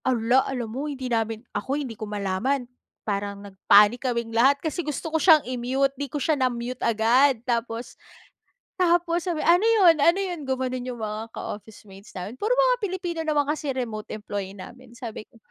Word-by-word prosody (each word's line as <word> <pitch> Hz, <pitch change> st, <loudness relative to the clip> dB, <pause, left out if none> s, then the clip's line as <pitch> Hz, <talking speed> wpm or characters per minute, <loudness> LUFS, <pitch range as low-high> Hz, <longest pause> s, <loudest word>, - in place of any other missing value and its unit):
Ala, 250 Hz, 0 st, +3 dB
alam 250 Hz, -3 st, -3 dB
mo 285 Hz, +4 st, -3 dB
hindi 265 Hz, -3 st, -6 dB
namin 225 Hz, 0 st, -1 dB
ako 270 Hz, +6 st, -2 dB
hindi 270 Hz, -6 st, -4 dB
ko 215 Hz, -1 st, -7 dB
malaman, 210 Hz, +7 st, -1 dB, 0.4 s
parang 200 Hz, -1 st, -3 dB
nag-panic 205 Hz, +4 st, +4 dB
kaming 235 Hz, -1 st, -3 dB
lahat. 265 Hz, +5 st, +4 dB
Kasi 315 Hz, +4 st, -3 dB
gusto 310 Hz, +1 st, -5 dB
ko -, -, +4 dB
siyang 315 Hz, -3 st, +6 dB
i-mute, 255 Hz, +2 st, 0 dB
'di 280 Hz, +1 st, -5 dB
ko 295 Hz, -, -4 dB
siya 310 Hz, +2 st, +1 dB
na-mute 250 Hz, 0 st, -2 dB
agad. 235 Hz, +5 st, +3 dB
Tapos 235 Hz, -1 st, -2 dB, 0.9 s
tapos 345 Hz, -1 st, +2 dB
sabi, 335 Hz, -3 st, -1 dB
"Ano 355 Hz, +6 st, +4 dB
'yon? 375 Hz, -8 st, +5 dB
Ano 335 Hz, +5 st, +5 dB
'yon?" 355 Hz, -7 st, -4 dB
gumanon 255 Hz, -1 st, -2 dB
'yong 240 Hz, -3 st, -5 dB
mga 215 Hz, +1 st, -5 dB
ka-office-mates 205 Hz, -1 st, -9 dB
namin. 200 Hz, +7 st, -7 dB
Puro 450 Hz, +4 st, +1 dB
mga -, -, +4 dB
Pilipino 365 Hz, -5 st, -3 dB
naman 295 Hz, -1 st, +2 dB
kasi 295 Hz, -3 st, -3 dB
remote 225 Hz, -5 st, -4 dB
employee 200 Hz, -2 st, -5 dB
namin. 240 Hz, +5 st, -12 dB
Sabi 230 Hz, -4 st, -8 dB
ko -, -, -28 dB
255 Hz, 175 wpm, -25 LUFS, 220-300 Hz, 0.9 s, siyang